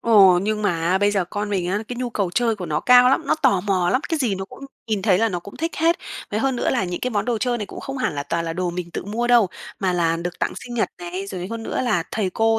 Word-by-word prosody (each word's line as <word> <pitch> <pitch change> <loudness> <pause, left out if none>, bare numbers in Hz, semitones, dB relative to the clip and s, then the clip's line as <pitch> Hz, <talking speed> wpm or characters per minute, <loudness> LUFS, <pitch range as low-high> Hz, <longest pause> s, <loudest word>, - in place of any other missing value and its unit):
Ồ, 195 -6 +6
nhưng 215 +1 -1
mà 205 - +3 0.2
á 190 - +3
bây 205 +1 +3
giờ 195 -3 +1
con 205 +3 -4
mình 190 -3 0
á, 205 +2 0
cái 245 - -5
nhu 250 -1 -3
cầu 200 -6 -1
chơi 230 +2 +1
của 180 - -5
nó 150 -1 -1
cao 250 0 +7
lắm, 270 - +3
nó - - +3
tò 260 -11 +2
mò 185 -3 +1
lắm, 255 - +2
cái 325 - 0
gì 235 -8 +1
nó 190 - -4
cũng 275 +7 -12 0.2
nhìn 210 -4 -1
thấy 195 -4 +4
là 225 0 +3
nó 175 -3 -3
cũng 200 - -11
thích 330 +1 -2
hết. 330 +1 +3 0.3
Với 210 +2 -1
hơn 270 -2 +1
nữa - - 0
là 240 -7 +1
những 175 0 -4
cái 255 - -1
món 210 -2 0
đồ 240 -2 0
chơi 240 +1 0
này 210 - -4
cũng - - -9
không 270 -1 -5
hẳn 255 - -1
là 140 - -2
toàn 165 +3 -2
là 165 - -2
đồ 180 0 -1
mình 175 -1 -5
tự - - -5
mua 225 +4 -2
đâu, 240 -5 +5 0.3
mà 185 -2 +1
là 165 -2 +1
được 175 +1 -5
tặng - - 0
sinh 240 -1 -7
nhật 225 - +1
này, 180 +3 -5
rồi 185 -2 -5
hơn 230 0 -4
nữa - - -2
là 215 -10 +1
thầy 200 -4 -1
cô 225 +3 +2
205 Hz, 315 wpm, -22 LUFS, 180-240 Hz, 0.3 s, cao